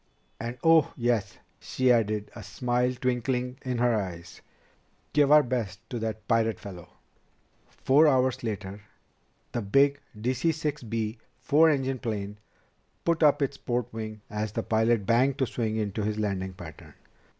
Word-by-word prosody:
And 120 +2 -5
oh, 165 -2 +4
yes," 115 -5 0 0.2
she 130 -1 +1
added, 110 -3 +1
a - - -8
smile 125 0 -1
twinkling 125 +1 -1
in 125 -2 -2
her 120 0 +3
eyes, 90 -5 -5 0.7
"give 145 -1 +4
our 150 0 +8
best 115 -7 -3
to 120 - -3
that 110 -1 -4
pirate 115 -3 +1
fellow!" 90 -4 -10 0.8
Four 145 +4 +4
hours 130 -3 +2
later 105 -2 -5 0.7
the 120 - -2
big 140 +7 +3 0.2
DC 130 +8 0
6 150 -1 -3
B 110 -1 -3 0.2
four 155 +3 +4
engine 135 -3 0
plane 105 -4 -4 0.7
put 170 -1 +1
up 150 -1 +5
its 135 - -2
port 120 -2 -3
wing 110 -1 -6
as 105 0 -4
the 115 - -2
pilot 110 -1 +1
banked 125 +5 +3
to 135 - +1
swing 110 -3 -2
into 105 -1 -2
his 105 +1 -2
landing 95 -3 -2
pattern. 85 -4 -12
120 Hz, 150 wpm, -27 LUFS, 105-130 Hz, 0.8 s, our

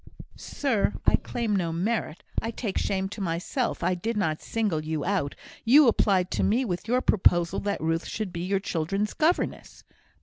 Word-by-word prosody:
"Sir! 230 -8 0
I - - +6
claim 230 -4 -2
no 175 -4 0
merit. 180 0 -2 0.2
I 225 - -3
take 220 -3 -3
shame 195 -1 -1
to 205 - -7
myself. 180 +8 -2
I - - +2
did 215 +6 -3
not 155 -6 0
single 205 -9 -1
you 155 -1 -3
out. 185 -7 -1 0.3
You 275 +4 +7
applied 190 -5 +2
to - - 0
me 240 +6 +2
with 180 -1 -4
your 250 +2 +2
proposal 175 -4 +3
that 200 0 -2
Ruth 165 +1 -1
should 210 -5 -4
be 170 - -4
your 190 +2 0
children's 195 +3 -2
governess." 330 +3 -1
195 Hz, 175 wpm, -26 LUFS, 170-225 Hz, 0.3 s, You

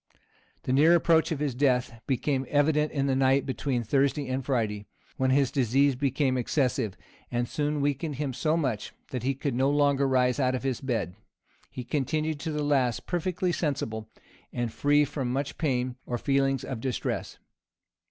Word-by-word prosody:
The 130 - -1
near 155 +5 +6
approach 165 -1 +3
of 160 - 0
his 145 -2 -1
death 125 -3 +1
became 135 0 0
evident 150 +1 +2
in 140 -2 0
the 135 -1 +1
night 135 +1 +3
between 130 -1 -2
Thursday 140 +4 +1
and 130 +1 -2
Friday, 110 -6 -1 0.3
when 130 0 +1
his 135 0 +3
disease 135 +2 +3
became 135 0 0
excessive, 125 -5 0 0.3
and 120 0 -1
soon 150 +1 -1
weakened 145 +1 -1
him 140 -1 -3
so 155 +5 +1
much, 130 -10 -2 0.2
that 125 - -3
he 135 +3 0
could 135 0 -2
no 130 +3 +2
longer 140 -1 +3
rise 125 0 +2
out 130 -1 +2
of 130 - -4
his 130 -3 -2
bed 120 -9 -2 0.6
He 125 - -6
continued 155 +4 -1
to 160 +2 -3
the 150 -1 -2
last 135 -5 +1
perfectly 180 +1 -1
sensible, 115 -10 -2 0.4
and 120 -2 -3
free 145 +5 +3
from 130 -3 -3
much 140 +2 -3
pain 125 -4 -1
or 120 - -1
feelings 135 0 +1
of 125 -4 -5
distress. 130 -2 -3
135 Hz, 170 wpm, -27 LUFS, 125-145 Hz, 0.6 s, near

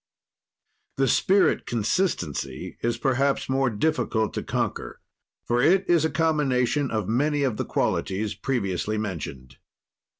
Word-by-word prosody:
"The 135 0 +2
spirit 195 +7 +3
consistency 105 - -2
is 120 0 0
perhaps 135 +2 +1
more 135 0 +1
difficult 110 -2 0
to - - -2
conquer, - - -3 0.5
for 120 +1 +1
it 185 +7 +3
is 170 -3 +4
a 160 - +2
combination 145 -4 +1
of 110 -4 -2
many 145 +6 +1
of 125 -6 0
the - - -2
qualities 105 +2 -1
previously 105 -2 -2
mentioned. 75 -11 -5
125 Hz, 125 wpm, -25 LUFS, 105-145 Hz, 0.5 s, is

